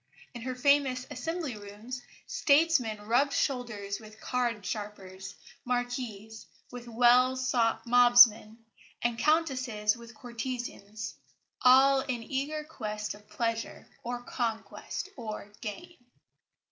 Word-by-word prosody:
In 240 - -8
her 255 +2 -4
famous 265 -1 +2
Assembly 320 0 -3
Rooms, 210 +5 -8 0.2
statesmen 280 -8 +2
rubbed 265 +6 +2
shoulders 215 -7 -2
with 215 -1 -14
card 240 -5 -1
sharpers, 195 -1 -6 0.3
Marquises 245 -3 -4 0.2
with 245 -1 -8
swell 245 +2 +4 0.5
mobsmen, 240 -2 +6 0.5
and 235 -1 0
Countesses 255 -9 +1
with 235 -1 -13
courtesans, 235 -3 -6 0.5
all 265 +2 +7
in 245 -3 -3
eager 285 +5 -3
quest 215 -8 -5
of 210 +1 -17
pleasure 230 +1 -3 0.2
or 245 0 -4
conquest 230 - -4
or 215 -3 -6
gain. 340 +11 -7
240 Hz, 105 wpm, -29 LUFS, 215-255 Hz, 0.5 s, all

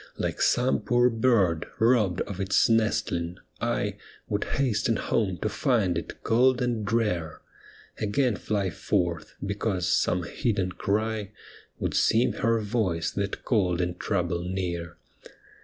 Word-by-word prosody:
Like - - -2
some 125 +2 +3
poor 120 0 +3
bird 110 -8 +2
robbed 110 -6 +3
of 100 -2 -5
its 95 0 +3
nestling, 95 -6 0 0.2
I - - -1 0.3
Would 105 0 -1
hasten 115 -4 0
home 100 -4 0
to - - +1
find 110 - +1
it 85 - -6
cold 125 +2 +3
and 120 -3 -1
drear, 105 -8 -1 0.6
Again 110 +3 +1
fly 100 -4 -1
forth, 85 -6 -1
because 100 -3 -1
some 90 0 +2
hidden 95 0 -1
cry 105 +1 -2 0.4
Would - - -2
seem 120 +3 +3
her 115 0 +1
voice 100 -7 -1
that 100 0 -3
called 90 -7 +1
in 90 0 0
trouble 85 -2 -1
near. 90 -2 -4
105 Hz, 130 wpm, -27 LUFS, 90-115 Hz, 0.6 s, some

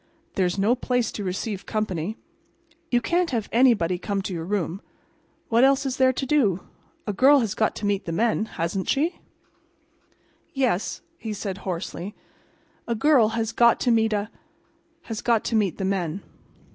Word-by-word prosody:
There's 180 -1 0
no 205 +5 +3
place 245 -1 0
to 205 - -5
receive 195 +2 -4
company. 210 -2 -2 0.7
You 240 -1 +2
can't 345 +6 +1
have 230 -5 -2
anybody 220 -8 +3
come 200 0 -2
to 190 - -4
your 165 -1 -4
room. 195 -1 -2 0.7
What 235 +2 +4
else 275 +1 +4
is 265 -1 -2
there 260 0 +5
to 265 +1 -3
do? 235 - +2 0.4
A 210 - -2
girl 270 +6 +6
has 215 -3 -1
got 220 0 0
to 205 - -4
meet 205 -1 0
the 165 - -3
men, 220 +4 +1
hasn't 175 -1 -3
she?" 315 +6 +1 1.4
"Yes," 250 -8 0 0.2
he 220 -2 -4
said, 195 -2 -5
hoarsely. 185 +2 -5 0.7
"A 235 - 0
girl 255 -1 +4
has 225 -1 -1
got 235 -1 +4
to 245 - +2
meet 225 -1 +3
a—has 225 +5 -7
got 230 -3 +2
to 230 - -1
meet 200 -6 +1
the 190 - -2
men." 190 -2 -2
215 Hz, 165 wpm, -24 LUFS, 195-245 Hz, 1.4 s, girl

